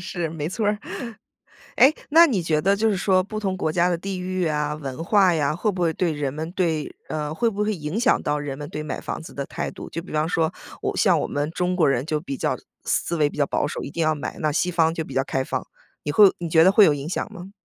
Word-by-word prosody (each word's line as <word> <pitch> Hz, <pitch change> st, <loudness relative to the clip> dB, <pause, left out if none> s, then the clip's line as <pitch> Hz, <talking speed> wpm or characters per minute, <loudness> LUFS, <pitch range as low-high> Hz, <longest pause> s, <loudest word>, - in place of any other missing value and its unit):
是， 175 Hz, -2 st, -3 dB
没 155 Hz, -1 st, -4 dB
错 210 Hz, +3 st, -2 dB
儿。 210 Hz, 0 st, +1 dB, 1.0 s
诶， 275 Hz, +4 st, +7 dB, 0.2 s
那 335 Hz, +2 st, +8 dB
你 205 Hz, -, 0 dB
觉 155 Hz, -2 st, +1 dB
得 195 Hz, +4 st, +2 dB
就 220 Hz, +1 st, +2 dB
是 200 Hz, -, 0 dB
说 185 Hz, 0 st, +3 dB
不 215 Hz, +2 st, -5 dB
同 190 Hz, -2 st, -1 dB
国 160 Hz, -4 st, -1 dB
家 175 Hz, +1 st, +3 dB
的 175 Hz, -, +1 dB
地 190 Hz, +1 st, -5 dB
域 185 Hz, -1 st, -1 dB
啊、 150 Hz, -1 st, -1 dB
文 145 Hz, 0 st, -6 dB
化 190 Hz, 0 st, +4 dB
呀， 150 Hz, -1 st, +1 dB
会 210 Hz, +5 st, 0 dB
不 180 Hz, -, -5 dB
会 165 Hz, -1 st, +2 dB
对 170 Hz, 0 st, 0 dB
人 145 Hz, -3 st, -2 dB
们 160 Hz, +2 st, -5 dB
对 165 Hz, -6 st, -1 dB
呃， 150 Hz, -1 st, -3 dB
会 230 Hz, +7 st, +1 dB
不 210 Hz, 0 st, -2 dB
会 215 Hz, 0 st, 0 dB
影 155 Hz, +5 st, -4 dB
响 250 Hz, +2 st, +3 dB
到 150 Hz, 0 st, 0 dB
人 145 Hz, -2 st, -4 dB
们 145 Hz, 0 st, -6 dB
对 150 Hz, -, -5 dB
买 155 Hz, -, -5 dB
房 -, -, -5 dB
子 -, -, -11 dB
的 140 Hz, -, -3 dB
态 -, -, -4 dB
度？ -, -, -9 dB
就 165 Hz, -, -5 dB
比 185 Hz, -, -11 dB
方 155 Hz, +1 st, +1 dB
说， 160 Hz, -2 st, +1 dB, 0.3 s
我 -, -, -2 dB
像 -, -, +4 dB
我 -, -, -1 dB
们 145 Hz, +2 st, -2 dB
中 180 Hz, +2 st, -1 dB
国 160 Hz, -5 st, +4 dB
人 130 Hz, -1 st, +1 dB
就 155 Hz, -1 st, -1 dB
比 140 Hz, -5 st, -5 dB
较 -, -, -1 dB, 0.3 s
思 170 Hz, -, 0 dB
维 150 Hz, -2 st, +3 dB
比 -, -, -12 dB
较 140 Hz, -, +3 dB
保 -, -, 0 dB
守， -, -, -4 dB
一 140 Hz, -, -6 dB
定 170 Hz, -, -2 dB
要 155 Hz, 0 st, +2 dB
买， 145 Hz, -, -5 dB
那 155 Hz, -2 st, +1 dB
西 180 Hz, +4 st, +1 dB
方 165 Hz, -2 st, +2 dB
就 160 Hz, -, -3 dB
比 135 Hz, -, -9 dB
较 135 Hz, 0 st, +1 dB
开 135 Hz, -1 st, -1 dB
放。 -, -, -4 dB, 0.4 s
你 145 Hz, -, -2 dB
会 200 Hz, +1 st, +7 dB
你 170 Hz, -1 st, -4 dB
觉 160 Hz, 0 st, +5 dB
得 190 Hz, -, +7 dB
会 205 Hz, +1 st, +7 dB
有 150 Hz, -, +5 dB
影 145 Hz, +2 st, -4 dB
响 210 Hz, -, -3 dB
吗？ 190 Hz, -1 st, -9 dB
165 Hz, 300 characters per minute, -23 LUFS, 150-185 Hz, 1.0 s, 那